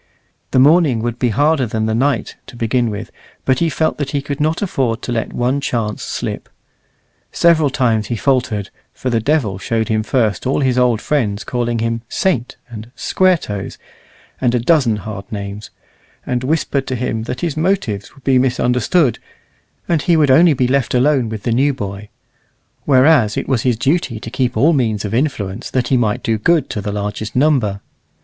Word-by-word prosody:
The - - 0
morning 140 -4 +4
would 120 0 -3
be 125 - +1
harder 145 +2 +2
than 110 0 -2
the 110 - 0
night 135 +5 0
to - - -12
begin 120 +1 0
with, 105 0 -6 0.3
but 130 -1 +2
he 170 - +2
felt 155 +2 -1
that 145 - -2
he 145 - -1
could 140 -1 -4
not 155 +5 0
afford 130 - -1
to - - -4
let 115 -2 -2
one 125 +3 0
chance 115 -6 -2
slip. - - -5 0.8
Several 160 -4 +3
times 115 -5 0
he 120 - -2
faltered, 120 -5 0 0.2
for 130 - -3
the 115 - +2
devil 115 -7 0
showed 110 +5 -1
him 110 -1 +1
first 110 -1 0
all 135 - +1
his 130 -2 +2
old 120 -2 +2
friends 110 -9 -1
calling 120 -1 -2
him 115 0 -1
"Saint" 130 -11 -1
and 115 -1 -9
"Square 185 -1 +2
toes," 100 -9 -6 0.6
and 125 -1 +2
a - - +2
dozen 125 -3 +3
hard 105 -1 -7
names, 100 0 -6 0.6
and 125 0 -2
whispered 140 -1 -1
to 130 - -2
him 115 -2 -3
that 125 +1 -5
his 165 -5 -2
motives 155 - -1
would 135 - -19
be 130 -2 +3
misunderstood, 125 - +1 0.7
and 165 -3 +1
he 170 +1 +2
would 145 -4 +4
only 165 +4 +6
be 125 -2 +1
left 130 -1 0
alone 130 -2 +2
with 110 -2 -6
the 120 - -1
new 135 +4 +2
boy; 100 -1 -6 0.8
whereas 130 -5 +4
it - - -2
was 130 -4 +1
his 125 -3 +1
duty 130 -2 0
to 115 - -8
keep 125 -2 -1
all 150 +9 +4
means 110 -7 0
of 105 - -4
influence, 115 -6 -2
that 130 -2 -1
he 135 - +3
might 110 -4 0
do 110 -1 0
good 160 +4 +2
to 105 - -3
the 105 - -3
largest 105 +1 -4
number. 125 -8 +2
125 Hz, 190 wpm, -17 LUFS, 110-140 Hz, 0.8 s, only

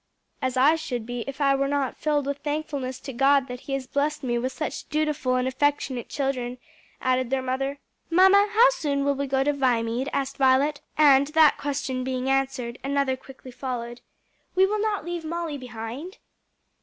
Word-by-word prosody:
"As 260 -1 -1
I 275 +5 +6
should 245 -7 -4
be 245 0 -4
if 275 +1 -6
I 275 -1 +4
were 275 0 +1
not 280 -2 -1
filled 295 -2 0
with 280 0 -3
thankfulness 290 -4 -3
to 270 - -7
God 270 +2 +3
that 250 -1 -6
he 270 - -6
has 270 -1 -2
blessed 285 +3 -1
me 240 -2 0
with 255 +2 -2
such 305 - -5
dutiful 300 -4 0
and 255 0 +1
affectionate 260 -2 -1
children," 255 -3 -2 0.4
added 255 -1 +1
the 270 0 +1
mother. 265 +2 -2 0.3
"Mamma, 380 +4 +6
how 460 +4 +6
soon 285 - -1
will 285 - +3
we 280 0 -3
go 265 0 +1
to 290 +1 +1
Viamede?" 250 -1 0
asked 275 0 -2
Violet; 275 +2 +3 0.2
and 280 -2 +6
that 310 0 +4
question 275 -3 -2
being 260 0 -1
answered, 265 -3 -1
another 275 -1 +1
quickly 260 0 -13
followed. 245 -1 -5 0.5
"We 380 +1 +6
will 420 +2 -1
not 420 -6 -1
leave 345 -1 -4
Molly 320 -2 -4
behind?" 245 - -7
275 Hz, 180 wpm, -25 LUFS, 255-290 Hz, 0.5 s, I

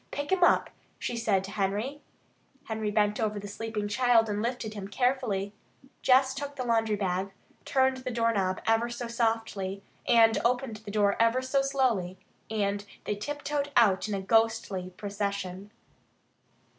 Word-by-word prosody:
Pick 285 +3 -4
him 380 -1 +3
up," - - +4 0.3
she 240 - -3
said 215 -5 +1
to 195 - -7
Henry. 210 +8 -2 0.6
Henry 220 -1 -3
bent 210 0 +1
over 215 -2 0
the 205 - -7
sleeping 210 0 -4
child 230 0 +3
and 205 0 -1
lifted 235 -2 -3
him 200 -2 -6
carefully. 205 -4 0 0.5
Jess 265 0 +4
took 285 +1 -5
the 255 -2 -4
laundry 225 -2 +2
bag, 190 -1 -1 0.4
turned 265 -1 +2
the 255 0 -5
doorknob 225 -6 0
ever 225 +1 +2
so 240 0 -5
softly, 225 -4 -1 0.6
opened 245 -2 0
the 215 -1 -11
door 205 -1 +2
ever 230 +3 +3
so 275 +1 +2
slowly, 250 -10 0 0.3
and 205 -2 -1 0.2
they - - -1
tiptoed 290 +5 -3
out 215 -3 +4
in 205 - -1
a 195 - -3
ghostly 225 -4 +1
procession. 200 -1 -4
220 Hz, 150 wpm, -28 LUFS, 200-250 Hz, 0.6 s, up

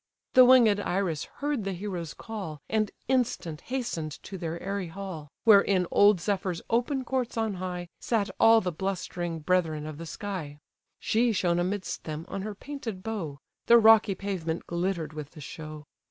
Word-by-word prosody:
The 255 - +9
winged 240 -5 +6
Iris 180 -5 -1
heard 290 -5 -3
the 195 0 -2
hero's 180 -3 -5
call, 195 -9 -6
And 215 -2 +1 0.2
instant 225 -11 0
hasten'd 235 -12 -3
to 195 - -8
their 170 -2 -4
airy 195 -1 -3
hall, 165 -4 -7
Where 210 -4 +8
in 190 -3 +1
old 205 -2 +6
Zephyr's 185 -2 -1
open 250 +3 +1
courts 250 -2 -2
on 220 -2 0
high, 180 -1 -4
Sat 220 -4 0
all 225 0 +7
the 180 - -2
blustering 175 -2 -3
brethren 160 -3 +1
of 155 0 -7
the 165 - -7
sky. 165 -5 -5 0.4
She 235 +2 +2
shone 175 -3 +1
amidst 185 +2 -2
them, 155 +1 -5
on 195 - -4
her 210 +1 -5
painted 230 -7 -6
bow; 190 -11 -4 0.3
The 235 - +8
rocky 220 -3 +6
pavement 175 -4 -3
glitter'd 170 -3 -2
with 150 -2 -7
the 160 - -11
show. 155 +1 -8
190 Hz, 170 wpm, -28 LUFS, 165-220 Hz, 0.4 s, The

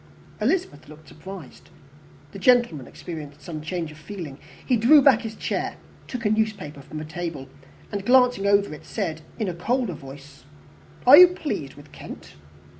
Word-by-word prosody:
Elizabeth 215 - -1
looked 155 +1 -14
surprised. 185 -2 -11 0.6
The 195 - -9
gentleman 235 - +3
experienced 150 -4 -9
some 155 -2 -6
change 165 0 -4
of 155 - -14
feeling; 155 -5 -8 0.3
he 255 - +2
drew 240 +7 +7
back 265 -4 +5
his 220 -2 -6
chair, - - -3 0.3
took 245 -3 -6
a 210 - +3
newspaper 215 -10 -2
from 155 - -10
the 155 - -5
table, 160 -4 -5 0.4
and, 200 -1 -3
glancing 245 -3 +4
over 200 -4 +3
it, 150 - -10
said, 165 -7 -4 0.2
in 220 - -2
a 180 - -2
colder 235 +4 -1
voice, 140 -1 -12 0.6
"Are 265 +4 +10
you 360 - +11
pleased 295 - -5
with 145 0 -15
Kent?" - - -11
180 Hz, 165 wpm, -24 LUFS, 150-235 Hz, 0.6 s, you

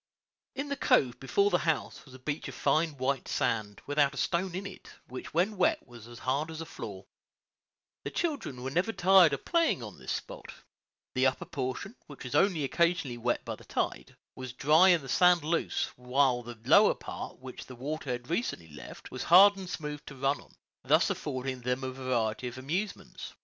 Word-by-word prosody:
In 280 +2 -4
the 280 - -1
cove 125 - +2
before 200 +10 +2
the 175 - +3
house 160 -2 -2
was 130 -2 -14
a 130 0 -16
beach 145 0 -3
of - - -8
fine 155 -2 +1
white 135 +1 -1
sand, 105 -2 -1
without 145 -1 +2
a - - -9
stone 175 +4 -1
in 195 +2 -4
it, 195 - -10 0.2
which 130 +1 -8
when 190 +6 +1
wet 320 - +2
was 120 -2 -12
as 120 0 -11
hard 135 +6 -1
as 160 -1 -7
a 165 - -5
floor. 100 -9 -8 1.0
The - - -3
children 280 - -3
were 130 - -3
never 180 +9 0
tired 185 -4 +6
of 140 -1 -4
playing 335 -1 +2
on - - -9
this - - -5
spot. - - -6 0.6
The 130 +1 +3
upper 130 - -2
portion, 140 - -4
which 145 - -11
was 125 - -6
only 165 0 +3
occasionally 165 -4 0
wet 120 +1 -1
by - - -3
the - - -16
tide, - - -3 0.2
was 130 -1 -7
dry 155 +8 +5
and 170 -5 +4
the - - -9
sand 180 +4 +4
loose, 165 +2 -1
while 125 0 +2
the 120 -1 -9
lower 200 - +6
part, - - -7
which 130 0 -10
the 130 - -10
water 145 +3 -5
had 125 0 -3
recently 165 - -2
left, 75 - -11
was - - -5
hard 195 +4 +8
and 190 -2 -8
smooth 150 -3 -5
to 140 - -8
run 135 +2 0
on, - - -21 0.3
thus - - +3
affording 130 0 -4
them 125 +2 -2
a 130 - -2
variety 125 -3 -1
of 120 +1 -7
amusements. 170 +11 -4
140 Hz, 200 wpm, -30 LUFS, 125-175 Hz, 1.0 s, hard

